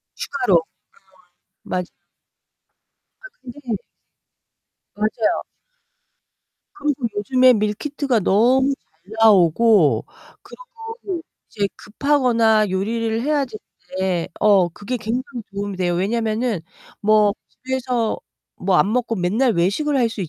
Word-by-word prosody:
추가로. 255 -9 -1 0.9
음. - - -23
맞아요. 180 -1 -1 1.3
아, - - -12
근데 260 +3 -10 1.3
맞아요. 215 +1 0 1.3
그리고 290 -9 -1
요즘에 255 +5 +4
밀키트가 235 +4 -1
너무 255 +8 +3
잘 175 -1 -22
나오고 190 - +5 0.4
그리고 455 -7 -8 0.3
이제 200 -1 -1
급하거나 230 -5 +2
요리를 225 +4 -1
해야 290 +1 +1
되는데 190 -6 -4
어 195 -4 +5
그게 205 +8 -5
굉장히 245 +3 -4
도움이 200 -1 -4
돼요. 175 -1 0
왜냐면은 220 +2 -1 0.4
뭐 210 -1 +4 0.2
집에서 255 -3 -2 0.4
뭐 185 0 0
안 205 - +3
먹고 240 -2 0
맨날 215 +8 +1
외식을 210 - +1
할 240 -3 +3
수 220 -2 -7
있 175 - -3
225 Hz, 230 characters per minute, -21 LUFS, 200-255 Hz, 1.3 s, 나오고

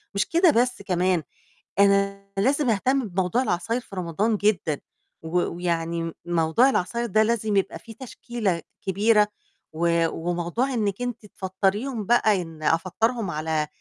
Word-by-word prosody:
مش 200 - +2
كده 340 0 +5
بس 250 -3 +1
كمان 180 -3 +1 0.6
أنا 200 0 +3
لازم 270 +6 +2
اهتم 255 +4 +1
بموضوع 190 +7 0
العصاير 225 +4 -1
في 200 - -12
رمضان 190 +5 0
جدًا 195 -8 +1 0.4
و 160 - -6 0.3
ويعني 170 -1 -2
موضوع 175 +9 +3
العصاير 235 +1 -1
ده 215 -1 +3
لازم 220 -2 0
يبقى 195 - -1
في 230 - -12
تشكيلة 225 -6 -3 0.2
كبيرة 210 +2 +3 0.5
و 170 +1 +2
وموضوع 175 +11 -2
إنِك 210 -2 -1
أنتِ 245 -3 -4
تفطريهم 200 +5 -2
بقى 215 -3 +3
إن 165 -2 -10
أفطّرهُم 190 +6 0
على 155 0 -1
200 Hz, 135 wpm, -25 LUFS, 175-230 Hz, 0.6 s, كده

